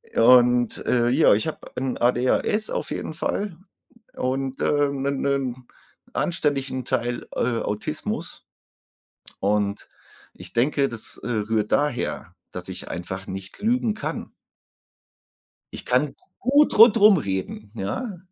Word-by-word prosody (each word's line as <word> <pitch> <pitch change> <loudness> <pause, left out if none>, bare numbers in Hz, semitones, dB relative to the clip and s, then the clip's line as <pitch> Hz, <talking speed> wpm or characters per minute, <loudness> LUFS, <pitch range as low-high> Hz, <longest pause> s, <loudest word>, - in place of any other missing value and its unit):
Und, 120 0 +5
äh, 120 -1 +2
ja, 125 - +5
ich 110 +9 0
habe 160 - -4 0.2
ein 130 -1 -2
ADHS 125 - +1
auf - - -3
jeden - - -4
Fall 175 +2 -3 0.6
und, 135 +1 -2
äh, 145 -1 +2
'nen 140 0 -2
'nen 130 -3 -1 0.5
anständigen 135 -6 -1
Teil, 120 0 -2
äh, 115 -2 0
Autismus. 105 0 -4 1.0
Und 100 0 0 0.5
ich - - -11
denke, 135 +3 +2
das, 115 -2 -4
äh, - - -4
rührt 110 -1 -1
daher, 145 -4 -1 0.2
dass - - -5
ich - - -7
einfach 95 +2 -5
nicht 95 0 -8
lügen 230 0 +1
kann. 215 - -5 1.4
Ich - - -7
kann - - +1 0.2
gut 285 +2 +3
rundrum 215 -3 +8
reden, 100 -2 -4
ja. 180 - -4
130 Hz, 120 wpm, -24 LUFS, 115-150 Hz, 1.4 s, rundrum